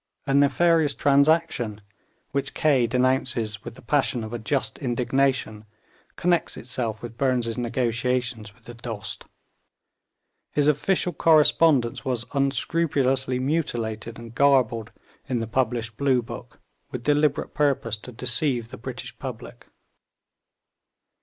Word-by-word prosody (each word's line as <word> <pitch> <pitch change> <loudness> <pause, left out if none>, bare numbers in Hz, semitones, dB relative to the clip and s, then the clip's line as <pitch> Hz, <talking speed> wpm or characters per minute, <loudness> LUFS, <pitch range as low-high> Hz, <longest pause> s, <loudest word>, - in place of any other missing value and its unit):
A 135 - 0
nefarious 145 +2 +3
transaction, 140 -6 +2 0.5
which 140 -1 -2
Kaye 140 -7 +3
denounces 125 -4 0
with 120 -1 -8
the - - -15
passion 130 -2 +1
of 110 +1 -7
a 120 - -3
just 130 +5 -1
indignation, 125 -3 0 0.5
connects 175 -1 0
itself 115 -3 -4
with 115 0 -8
Burnes' 125 -4 +1
negotiations 120 -1 -1
with 120 - -27
the 120 - -10
Dost; 110 -3 -6 1.2
his 145 -1 +2
official 175 +4 +1
correspondence 150 -5 +4
was 125 -4 -2
unscrupulously 135 -2 +1
mutilated 120 -6 -2
and 115 0 -10
garbled 120 -5 +2 0.4
in 125 -2 0
the 115 - -2
published 115 -1 -1
Blue 130 -3 +2
Book - - -10 0.3
with 125 - -6
deliberate 150 0 +1
purpose 140 -6 +1
to 125 - -11
deceive 120 0 0
the - - -9
British 125 +2 -7
public. 125 -2 -8
125 Hz, 120 wpm, -25 LUFS, 115-140 Hz, 1.2 s, correspondence